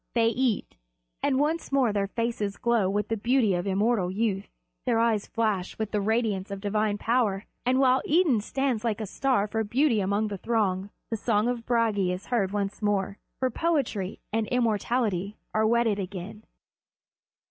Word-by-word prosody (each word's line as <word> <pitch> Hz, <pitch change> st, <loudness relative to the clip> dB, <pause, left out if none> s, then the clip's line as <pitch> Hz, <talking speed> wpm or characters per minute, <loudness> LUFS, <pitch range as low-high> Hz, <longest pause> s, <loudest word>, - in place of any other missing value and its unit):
They 230 Hz, -1 st, +4 dB
eat; 245 Hz, -, -1 dB, 0.4 s
and 275 Hz, -2 st, +2 dB
once 315 Hz, +2 st, 0 dB
more 260 Hz, -6 st, +3 dB
their 200 Hz, -1 st, 0 dB
faces 215 Hz, -2 st, -2 dB
glow 235 Hz, -5 st, +2 dB
with 205 Hz, +1 st, -1 dB
the 225 Hz, -, +1 dB
beauty 235 Hz, -1 st, +2 dB
of 175 Hz, +2 st, -1 dB
immortal 200 Hz, 0 st, +1 dB
youth, 200 Hz, 0 st, -1 dB, 0.4 s
their 240 Hz, -3 st, +1 dB
eyes 225 Hz, -3 st, +2 dB
flash 210 Hz, -5 st, -1 dB
with 220 Hz, -1 st, -3 dB
the 210 Hz, -, 0 dB
radiance 215 Hz, -2 st, 0 dB
of 200 Hz, -1 st, -5 dB
divine 210 Hz, +1 st, 0 dB
power, 220 Hz, -4 st, +1 dB, 0.2 s
and, 255 Hz, +1 st, +3 dB
while 260 Hz, -1 st, +4 dB
Idun 305 Hz, -, +4 dB
stands 255 Hz, 0 st, -1 dB
like 230 Hz, -2 st, -1 dB
a 215 Hz, -, -3 dB
star 250 Hz, +1 st, +1 dB
for 220 Hz, +1 st, -1 dB
beauty 235 Hz, +2 st, +2 dB
among 200 Hz, +2 st, 0 dB
the 200 Hz, -2 st, -5 dB
throng, 200 Hz, -4 st, 0 dB, 0.2 s
the 225 Hz, -, 0 dB
song 215 Hz, 0 st, +1 dB
of 240 Hz, -2 st, -3 dB
Bragi 220 Hz, -6 st, +2 dB
is 180 Hz, +2 st, -5 dB
heard 200 Hz, -6 st, +2 dB
once 200 Hz, 0 st, -2 dB
more; 200 Hz, -1 st, 0 dB, 0.2 s
for 260 Hz, -1 st, +1 dB
poetry 240 Hz, -, -1 dB
and 220 Hz, -1 st, 0 dB
immortality 220 Hz, -4 st, 0 dB, 0.2 s
are 215 Hz, 0 st, +3 dB
wedded 230 Hz, -2 st, +2 dB
again. 195 Hz, +3 st, -6 dB
220 Hz, 170 wpm, -27 LUFS, 200-240 Hz, 0.4 s, They